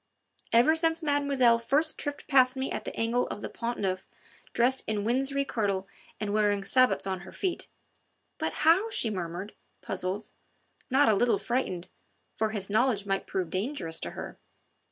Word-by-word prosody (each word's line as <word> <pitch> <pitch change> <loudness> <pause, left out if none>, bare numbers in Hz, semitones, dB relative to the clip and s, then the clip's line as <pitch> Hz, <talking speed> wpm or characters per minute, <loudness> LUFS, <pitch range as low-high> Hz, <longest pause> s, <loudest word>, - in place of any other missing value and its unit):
"Ever 245 +8 +5
since 325 0 +1
mademoiselle 280 -5 +3
first 290 +7 +1
tripped 290 0 -4
past 260 -2 +4
me 265 +1 -2
at - - -4
the - - -5
angle 235 +2 +1
of 205 - -6
the - - -5
Pont 235 +1 -4
Neuf 190 -1 -2 0.4
dressed 255 +3 +2
in 210 -2 -1
winsey 270 +4 +1
kirtle 200 -6 -1 0.3
and 205 -1 -2
wearing 205 -2 +2
sabots 255 +1 +3
on 190 -1 -2
her 185 +1 -11
feet...." 370 -3 -3 0.7
"But - - -1
how?" 365 +8 +5
she 235 - 0
murmured, 180 +1 -5 0.3
puzzled, 190 +3 -2 0.6
not 270 +1 +4
a 220 - +5
little 235 +4 +3
frightened, 210 -8 -2 0.5
for 220 0 0
his 205 -3 -4
knowledge 215 -1 +2
might 195 -1 -1
prove 180 -4 -2
dangerous 185 - -2
to - - -4
her. - - -7
230 Hz, 165 wpm, -28 LUFS, 195-270 Hz, 0.7 s, Ever